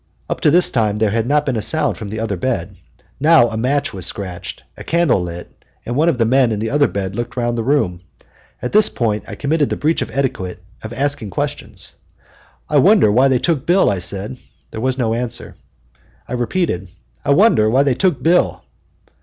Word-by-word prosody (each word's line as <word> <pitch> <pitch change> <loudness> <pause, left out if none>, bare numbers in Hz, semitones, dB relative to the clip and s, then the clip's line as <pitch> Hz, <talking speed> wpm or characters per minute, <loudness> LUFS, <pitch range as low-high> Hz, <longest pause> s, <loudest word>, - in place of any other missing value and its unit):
Up - - -4
to - - +4
this 175 +4 +5
time 105 -4 0
there 105 -1 +1
had 115 +1 -1
not 150 +2 +2
been 135 - -1
a 110 - -1
sound 155 +8 +1
from 110 - -7
the 110 +2 -5
other 110 -3 -2
bed. 100 -2 -3 0.4
Now 150 -4 +5
a 110 - -6
match 130 +6 0
was 95 -2 -7
scratched, 95 -5 -6
a - - -10
candle 170 - +2
lit, 85 0 -7 0.3
and 120 - -3
one 160 +5 +3
of 145 - 0
the 115 - +2
men 125 0 +3
in 110 - -1
the 110 +2 -3
other 145 0 +3
bed 95 -1 -4
looked 120 0 -5
round 120 -1 0
the 115 - -1
room. 110 -10 0 0.6
At 125 - -2
this 215 -1 +5
point 105 -4 -1
I - - -7
committed 150 0 0
the - - -1
breach 160 +2 0
of - - -3
etiquette 95 -10 -3 0.2
of 110 - -8
asking 135 -3 -2
questions. 90 - -5 0.7
"I - - +1
wonder 105 - +5
why 130 +6 +4
they 130 -2 +3
took 155 +1 -1
Bill," 180 - +4
I 100 - -2
said. 100 +7 -3 0.3
There 110 - -6
was 130 +1 0
no 115 -4 0
answer, 120 0 -4 0.4
and - - -36 0.3
I - - -4
repeated, 120 - -2 0.3
"I - - -4
wonder 140 - +4
why 130 +5 +3
they 140 -2 +2
took 150 -2 0
Bill." 175 +2 +2
120 Hz, 210 wpm, -18 LUFS, 105-145 Hz, 0.7 s, this